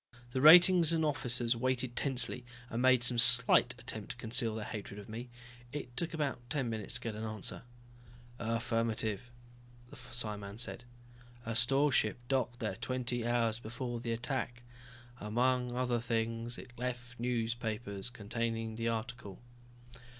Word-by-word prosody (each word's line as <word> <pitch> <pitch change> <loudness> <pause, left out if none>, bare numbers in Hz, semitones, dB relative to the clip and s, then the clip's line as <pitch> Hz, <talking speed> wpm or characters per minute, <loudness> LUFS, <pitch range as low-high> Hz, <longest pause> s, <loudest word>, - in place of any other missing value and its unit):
The 130 - -1
ratings 175 +2 +9
and 160 -1 +2
officers 120 -5 +1
waited 130 0 -1
tensely, 125 -3 +1 0.3
and 115 +1 -1
made 130 -1 +5
some 120 -1 +3
slight 125 0 +5
attempt 110 -3 -5
to - - -5
conceal 115 -1 0
their 110 -2 -4
hatred 105 -1 -6
of 100 - -10
me. 120 +3 -7 0.4
It 135 -4 -6
took 170 +5 -1
about 145 -5 -1
ten 135 -5 -1
minutes 110 0 -5
to 125 - -2
get 115 -2 -3
an 110 +1 -6
answer. 110 -2 -2 0.8
"Affirmative," 115 -1 -1 0.6
the - - -10
psiman 110 -5 -5
said. 120 0 -3 0.6
"A 115 0 -3
store 135 +5 +3
ship 110 -3 +2
docked 125 -3 0
there 105 -5 -3
twenty 120 0 -2
hours 115 -2 +1
before 120 +1 -5
the 115 0 -3
attack. 120 +1 -3 0.6
Among 125 +3 +1
other 125 -1 0
things, 115 0 -2
it 125 - -10
left 120 -1 -5
newspapers 115 -3 -2
containing 115 0 -3
the 115 0 -1
article." 115 -3 -4
120 Hz, 145 wpm, -33 LUFS, 115-125 Hz, 0.8 s, ratings